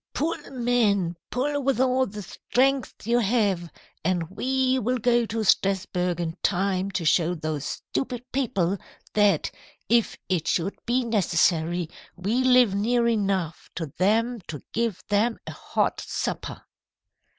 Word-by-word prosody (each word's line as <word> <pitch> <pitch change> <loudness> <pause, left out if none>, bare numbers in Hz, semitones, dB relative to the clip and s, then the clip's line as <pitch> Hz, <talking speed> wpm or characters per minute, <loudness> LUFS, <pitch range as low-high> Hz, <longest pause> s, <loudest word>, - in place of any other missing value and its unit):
"'Pull, 320 +5 0
men! 225 -8 +1
Pull 285 +3 -1
with 270 -3 +1
all 260 0 +3
the 210 +1 -7
strength 260 +5 0
you 235 +2 +3
have, 200 -6 +1 0.3
and 175 -1 0
we 260 +4 +1
will 250 +2 0
go 240 0 +2
to 225 +1 -2
Strasburg 180 -3 +1
in 165 -1 -2
time 190 0 +1
to 180 -3 -3
show 170 +2 +3
those 155 -2 -3
stupid 250 -2 -4
people 200 -8 0 0.3
that, 205 -1 +3 0.4
if 235 -1 +2
it 175 -4 0
should 185 +3 0
be 245 +1 +2
necessary, 175 -5 +1 0.3
we 210 +8 0
live 250 -5 +5
near 235 +4 +2
enough 195 -7 -1
to 160 -5 -5
them 225 +4 +2
to 150 -4 -7
give 225 -5 -1
them 215 +3 +2
a - - -5
hot - - -1
supper.' - - -4
210 Hz, 140 wpm, -25 LUFS, 180-245 Hz, 0.4 s, live